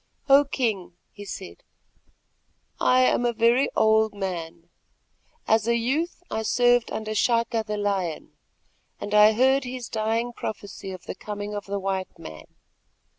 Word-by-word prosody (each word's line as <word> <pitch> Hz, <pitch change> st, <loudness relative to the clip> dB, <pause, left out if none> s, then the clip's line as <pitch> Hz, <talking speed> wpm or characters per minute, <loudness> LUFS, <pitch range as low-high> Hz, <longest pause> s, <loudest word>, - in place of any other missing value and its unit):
"O 280 Hz, +1 st, +6 dB
King," 220 Hz, -10 st, -2 dB, 0.2 s
he 205 Hz, -, -11 dB
said, 190 Hz, -1 st, -8 dB, 1.2 s
"I 255 Hz, 0 st, +4 dB
am 255 Hz, -1 st, +3 dB
a 240 Hz, -, +2 dB
very 235 Hz, +4 st, +3 dB
old 220 Hz, -1 st, +3 dB
man; 170 Hz, -4 st, -5 dB, 0.8 s
as 220 Hz, 0 st, +2 dB
a 235 Hz, -, +3 dB
youth 295 Hz, +10 st, -1 dB
I 220 Hz, -, -1 dB
served 245 Hz, +1 st, +2 dB
under 215 Hz, 0 st, -4 dB
Chaka 230 Hz, +1 st, +1 dB
the 210 Hz, 0 st, -2 dB
Lion, 195 Hz, -6 st, -2 dB, 0.7 s
and 205 Hz, -, -5 dB
I 210 Hz, +1 st, +7 dB
heard 265 Hz, +4 st, +3 dB
his 250 Hz, -1 st, -6 dB
dying 225 Hz, +2 st, -1 dB
prophecy 205 Hz, -3 st, -7 dB
of 185 Hz, -2 st, -9 dB
the -, -, -5 dB
coming 205 Hz, 0 st, -6 dB
of 205 Hz, -1 st, -5 dB
the 200 Hz, +1 st, -2 dB
white 190 Hz, -1 st, -3 dB
man. 80 Hz, 0 st, -10 dB
220 Hz, 145 wpm, -25 LUFS, 200-240 Hz, 1.2 s, I